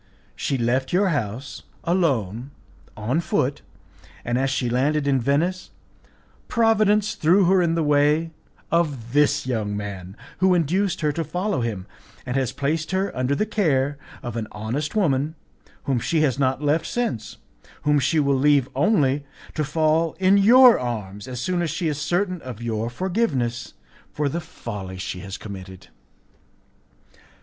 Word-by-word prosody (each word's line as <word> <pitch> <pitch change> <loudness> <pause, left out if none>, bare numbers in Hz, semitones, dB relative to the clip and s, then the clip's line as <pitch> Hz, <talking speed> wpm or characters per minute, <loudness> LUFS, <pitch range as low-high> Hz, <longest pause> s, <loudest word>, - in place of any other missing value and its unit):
She 135 - -1
left 130 +2 0
your 190 +2 +3
house 130 - -3 0.2
alone 135 - 0 0.5
on 115 +9 0
foot, 145 -3 -1 0.6
and 120 +1 0
as 135 +1 +1
she 130 -2 -1
landed 140 +5 +1
in 135 -2 +2
Venice 170 +8 0 0.8
Providence 215 -3 +3
threw 180 +5 +3
her 185 +1 +4
in 165 -1 +1
the 165 - +1
way 150 +2 +2 0.4
of 145 -8 0
this 145 -2 +3
young 110 -5 -2
man, 100 -1 -7 0.2
who 185 -1 +4
induced 175 +3 0
her 150 -1 +2
to 165 +3 -2
follow 180 +1 -2
him, 105 -6 -3 0.4
and 125 - -3
has 135 -3 0
placed 155 +3 -2
her 190 +1 -1
under 130 +2 0
the 215 - 0
care 145 -10 0 0.2
of 120 -1 -5
an 115 -2 -3
honest 125 - -3
woman, 155 -6 +1 0.5
whom 135 -3 0
she 160 +6 0
has 140 -3 +1
not 135 +1 +1
left 155 +3 +1
since, 230 - -3 0.5
whom 150 0 +3
she 140 +4 +2
will 140 -2 +2
leave 140 -2 +3
only 145 -4 +2 0.3
to 155 - -1
fall 155 +2 +1
in 190 +1 +5
your 240 +5 +7
arms 105 -3 -5
as 125 -2 -5
soon 175 +7 -1
as 170 - -1
she 170 +3 -2
is 150 -1 -2
certain 180 +2 -1
of 125 -4 -8
your 115 -1 -2
forgiveness 130 - -2 0.4
for 150 -1 -1
the 170 +5 -3
folly 105 - -7
she 90 0 -5
has 95 0 -7
committed." 95 -2 -10
145 Hz, 155 wpm, -23 LUFS, 120-170 Hz, 0.8 s, your